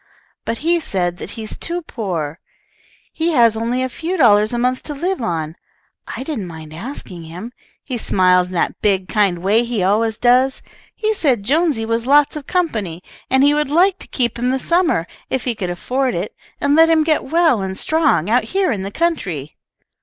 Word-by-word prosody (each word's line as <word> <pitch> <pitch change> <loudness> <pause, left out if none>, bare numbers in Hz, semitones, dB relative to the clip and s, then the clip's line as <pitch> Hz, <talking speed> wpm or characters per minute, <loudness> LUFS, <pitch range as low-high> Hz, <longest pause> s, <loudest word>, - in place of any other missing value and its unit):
But 230 - -2
he 340 +1 +3
said 175 - -1
that - - -7
he 225 - -5
is 215 - -5
too 345 +1 -3
poor. 170 - -4 0.7
He 330 +1 0
has 230 -5 +4
only 235 +3 -1
a - - 0
few 335 +8 -4
dollars 215 -6 +5
a 240 - -2
month 250 +1 0
to 295 - -4
live 365 +4 -2
on. 160 -6 -3 0.5
I - - -5
didn't 265 - -4
mind 160 -2 -10
asking 180 - -7
him. 180 +9 -8 0.3
He 250 -4 -4
smiled 180 -3 +3
in 185 - -10
that 175 - -1
big, 195 -3 +1
kind 195 -5 +1
way 215 +5 +3
he 235 -5 -2
always 220 +3 +1
does. 255 +2 +3 0.3
He 435 0 0
said 270 - +1
Jonesy 290 -2 +1
was 230 +1 -1
lots 290 +2 +4
of 295 -2 -7
company, 215 - -1 0.3
and 265 +1 +4
he 290 +1 +5
would 300 -2 0
like 360 +5 +3
to - - -11
keep 240 -3 -1
him 250 +1 0
this 260 0 -2
summer, 335 - +2 0.2
if 260 -3 -1
he 245 - 0
could 195 -5 -4
afford 255 +9 -1
it, - - -4 0.2
and 285 0 +2
let 325 +1 +6
him 320 -1 +4
get 310 -1 +1
well 320 - +3
and 190 0 -4
strong 315 - +2
out 240 +4 +2
here 385 -3 0
in 205 -5 -2
the 195 - -4
country." 195 - -2
240 Hz, 200 wpm, -19 LUFS, 190-300 Hz, 0.7 s, let